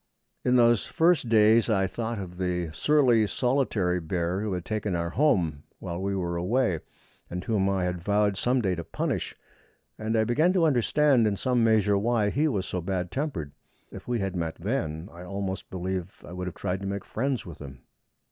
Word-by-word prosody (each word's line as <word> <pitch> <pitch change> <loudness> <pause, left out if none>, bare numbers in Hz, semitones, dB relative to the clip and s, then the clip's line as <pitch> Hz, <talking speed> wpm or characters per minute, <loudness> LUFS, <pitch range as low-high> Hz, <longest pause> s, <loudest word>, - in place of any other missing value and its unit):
In 125 - +3
those 120 -3 +4
first 165 -7 +2
days 110 +1 +5
I 95 -3 +2
thought 115 +3 -3
of 90 -3 -7
the 90 -3 -1
surly 125 - +3
solitary 110 -7 0
bear 85 +2 -2
who 105 -2 -2
had 90 -1 -4
taken 105 -3 -2
our 85 0 -2
home 90 - +2 0.2
while 85 +1 -5
we 100 0 -1
were 85 -2 -2
away, 95 0 +1 0.5
and 90 0 -4
whom 100 -3 +1
I 95 -1 0
had 90 -1 -2
vowed 105 +2 +2
some 125 +5 +1
day 95 -2 +1
to 85 -1 -4
punish; - - -3 0.6
and 110 +1 -1
I 110 - +4
began 155 +11 +2
to 180 -3 +3
understand 135 -2 +3
in 100 -2 0
some 125 0 +1
measure 105 -3 +3
why 110 -1 +1
he 150 +7 +2
was 100 -10 -1
so 90 - -3
bad 90 0 -3
tempered. 130 - -3 0.4
If - - -10
we 120 -1 0
had 95 -3 -2
met 85 -2 -2
then, 85 - -3
I 85 - -11
almost 95 +1 -4
believe 95 0 -4
I 85 - -9
would 90 0 -4
have 90 - -6
tried 95 -1 -2
to 100 - -5
make 100 0 -4
friends 130 +1 -2
with 85 -3 -10
him. 65 -4 -10
100 Hz, 195 wpm, -27 LUFS, 90-120 Hz, 0.6 s, days